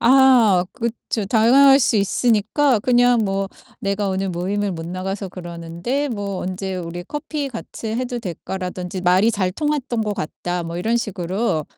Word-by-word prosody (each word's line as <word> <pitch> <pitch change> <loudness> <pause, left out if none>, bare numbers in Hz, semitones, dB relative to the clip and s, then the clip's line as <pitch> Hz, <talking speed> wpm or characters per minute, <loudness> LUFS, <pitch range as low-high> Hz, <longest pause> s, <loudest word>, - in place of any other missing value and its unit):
아 240 -7 +5
그쵸. 235 -2 -3
당할 265 +6 +6
수 235 -4 +2
있으니까 225 +5 +2
그냥 245 0 +4
뭐 195 0 -1 0.3
"내가 200 0 -1
오늘 190 0 -1
모임을 195 +3 -1
못 165 -1 -6
나가서 190 +2 -4
그러는데 175 - -4
뭐 200 -5 -3
언제 190 +1 -4
우리 175 0 -6
커피 295 +2 -4
같이 230 -2 -7
해도 245 0 -2
될까?"라든지 185 -1 -5
"말이 185 +5 +4
잘 190 -5 -1
통했던 275 -3 -1
것 210 -1 -2
같다." 175 +1 -4
뭐 165 +1 -5
이런 225 +6 0
식으로 185 -4 -1
200 Hz, 300 characters per minute, -21 LUFS, 180-240 Hz, 0.3 s, 당할